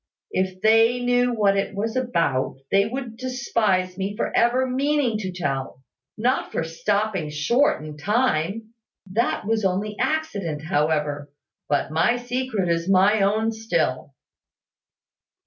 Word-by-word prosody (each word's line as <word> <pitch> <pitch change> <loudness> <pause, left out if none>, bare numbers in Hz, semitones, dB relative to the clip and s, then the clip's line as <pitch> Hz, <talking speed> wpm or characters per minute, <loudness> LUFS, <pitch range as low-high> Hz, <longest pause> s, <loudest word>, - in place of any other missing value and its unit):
"If 185 0 -1
they 225 +3 +4
knew 245 0 +2
what 205 -4 +2
it 195 +1 -1
was 220 +4 -2
about, 170 - 0 0.2
they 200 +1 +4
would 240 -1 -6
despise 220 -7 -1
me 195 +2 -2
for - - -2
ever 245 +2 +3
meaning 265 -3 +1
to 190 -3 -4
tell 135 -6 -4 0.3
not 250 +4 0
for - - -1
stopping 195 +1 -1
short 155 - +1
in 150 -1 -8
time. 215 +1 0 0.3
That 220 +5 -1
was 220 0 0
only 195 +3 -1
accident, 225 - -2
however. 150 -3 0 0.4
But 145 0 0
my 165 +10 +2
secret 245 -5 -2
is 170 +1 0
my 195 +3 +4
own 215 +3 +2
still." 170 - -2
205 Hz, 130 wpm, -23 LUFS, 170-240 Hz, 0.4 s, they